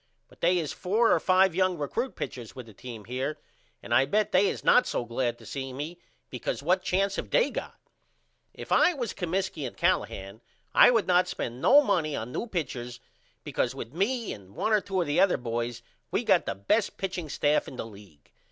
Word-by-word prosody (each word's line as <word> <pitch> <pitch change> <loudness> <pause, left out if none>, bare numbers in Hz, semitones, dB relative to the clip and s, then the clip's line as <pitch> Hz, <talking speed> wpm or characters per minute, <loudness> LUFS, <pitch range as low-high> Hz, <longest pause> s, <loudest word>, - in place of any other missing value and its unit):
But - - -22
they 180 +2 +3
is 160 -4 -2
four 220 +6 +2
or 175 - +3
5 185 +1 +4
young 185 0 +1
recrut 230 - -3
pitchers 120 -4 -6
with 130 -2 -8
the 110 - -14
team 115 -1 -9
here 130 +6 -3 0.5
and 120 - -3
I 130 +3 +5
bet 210 +8 +1
they 190 +2 +4
is - - -3
not 250 - +5
so 120 - -2
glad 120 0 -2
to 115 - -15
see 135 +3 -5
me 155 +6 -6 0.3
because 125 +2 -4
what 180 +4 +2
chance 195 +1 0
have - - -4
they - - +3
got? - - -6 0.7
If - - -10
I 360 - +5
was 245 -5 -3
Comiskey 180 -3 -2
and - - -11
Callahan 100 +3 -1 0.3
I - - +8
would 230 -4 +2
not 180 0 +3
spend 120 +2 -5
no 290 - +7
money 160 - 0
on 115 +3 -5
new 235 - -3
pitchers 125 - -4 0.4
because - - -1
with 115 - -7
me 230 +7 -1
and 100 -1 -14
1 220 - 0
or 210 - +4
2 190 -2 -1
of - - 0
the 145 0 0
other 195 - +4
boys 120 0 -4 0.3
we - - -1
got - - +3
the - - -2
best 190 - 0
pitching 185 -4 -4
staff 145 +1 +1
in - - -8
the 125 - -5
league. 100 -9 -15
155 Hz, 210 wpm, -28 LUFS, 120-190 Hz, 0.7 s, I